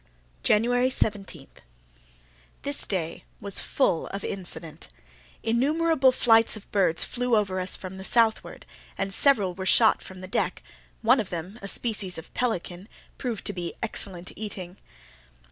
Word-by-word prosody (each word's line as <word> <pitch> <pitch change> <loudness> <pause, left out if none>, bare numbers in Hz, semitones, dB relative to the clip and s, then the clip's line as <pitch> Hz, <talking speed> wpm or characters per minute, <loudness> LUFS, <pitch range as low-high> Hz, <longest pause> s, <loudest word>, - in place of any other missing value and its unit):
January 245 +4 +3
17.—This - - -5
day 170 -5 -2 0.2
was 200 -1 -1
full 215 -11 +1
of 200 0 -6
incident. 170 -4 +2 0.6
Innumerable 275 +4 +3
flights 225 -3 +4
of 215 - -13
birds 185 -5 +2
flew 245 -1 0
over 190 -3 0
us 185 +1 -1
from 190 0 -8
the 190 - -8
southward, 225 +1 +1 0.3
and 195 0 -1
several 205 -8 +3
were 190 +1 -5
shot 220 +2 +5
from 185 -1 -11
the 185 - -7
deck, - - -1 0.4
one 245 +4 +5
of 210 -4 -3
them, 180 +6 -6
a 200 - -6
species 205 -4 -2
of 160 - -10
pelican, 195 -4 -2 0.3
proved 240 -5 -4
to 205 - -1
be 175 -2 -5
excellent 180 -2 -4
eating. 190 -4 -6
195 Hz, 140 wpm, -26 LUFS, 175-230 Hz, 0.6 s, shot